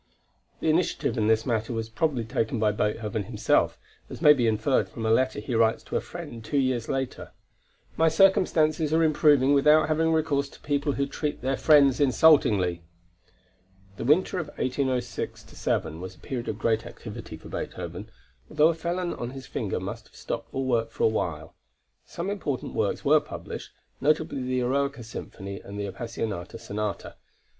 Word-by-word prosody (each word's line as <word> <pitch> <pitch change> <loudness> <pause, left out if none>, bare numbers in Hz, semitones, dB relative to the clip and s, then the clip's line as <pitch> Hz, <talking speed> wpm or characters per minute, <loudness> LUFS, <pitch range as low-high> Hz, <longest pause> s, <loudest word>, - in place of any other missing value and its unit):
The - - +1
initiative 170 -3 0
in 110 -3 +1
this 110 0 +3
matter 115 -1 -1
was 115 -1 -3
probably 125 +2 -1
taken 115 +2 -1
by 105 -1 +3
Beethoven 105 0 -2
himself, 110 0 +1 0.3
as - - -8
may 150 - +8
be 125 -5 +1
inferred 110 +5 +1
from 115 - -6
a 110 - +2
letter 130 0 +2
he 110 +4 -5
writes 115 0 +2
to - - -6
a - - +2
friend 145 -10 -8
two 110 +6 -2
years 130 -4 0
later: 135 -2 -3 0.6
"My 165 - +4
circumstances 160 -3 +3
are 165 - +4
improving 145 -3 +4
without 150 +3 +5
having 160 +1 +2
recourse 150 -3 +1
to - - -16
people 145 0 0
who 140 - 0
treat 145 -1 -4
their 135 +1 +1
friends 140 -2 +5
insultingly." 120 - +4 1.2
The - - -4
winter 175 +8 +2
of 165 - -4
1806 130 -3 -2
7 80 +2 -2
was 95 0 -7
a - - -23
period 125 -3 -5
of 105 - -3
great 115 0 +1
activity 115 -7 -9
for - - -13
Beethoven, - - -6 0.4
although 155 +1 +4
a - - +2
felon 175 +2 -2
on 120 - -5
his 135 0 -9
finger - - -3
must - - -6
have - - -24
stopped - - -5
all 135 0 -2
work 115 -3 +1
for 115 - -4
a - - +6
while. 80 -8 -2 0.5
Some 180 +4 -4
important 150 -10 -3
works - - -1
were - - +6
published, - - -8 0.3
notably 155 -2 +1
the 130 0 -1
Eroica 140 0 0
Symphony 100 -3 -7
and 100 +1 -8
the 100 - -2
Appassionata 100 -2 -5
Sonata. 105 -2 -4
130 Hz, 175 wpm, -26 LUFS, 110-150 Hz, 1.2 s, may